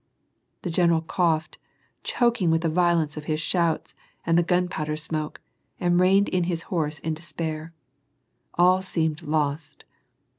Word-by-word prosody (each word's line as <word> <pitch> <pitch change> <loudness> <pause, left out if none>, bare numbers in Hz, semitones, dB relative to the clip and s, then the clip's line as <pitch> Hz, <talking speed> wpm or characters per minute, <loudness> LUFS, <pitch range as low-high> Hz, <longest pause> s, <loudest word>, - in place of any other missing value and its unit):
The 175 - -2
general 170 -1 +3
coughed, 160 -2 0 0.4
choking 235 -7 +1
with 160 0 +2
the 165 - 0
violence 165 -3 +1
of 150 - -6
his 155 0 -1
shouts 165 +1 0 0.3
and 165 - +2
the 170 - +5
gunpowder 175 -3 0
smoke, 155 -1 -4 0.4
and 175 -1 +2
reined 195 +2 +4
in 180 -2 0
his 170 -2 -2
horse 155 -3 -1
in 160 +1 -3
despair. 160 -1 -5 0.8
All 180 +2 +4
seemed 160 -4 -1
lost. 150 -1 -2
165 Hz, 140 wpm, -25 LUFS, 155-175 Hz, 0.8 s, the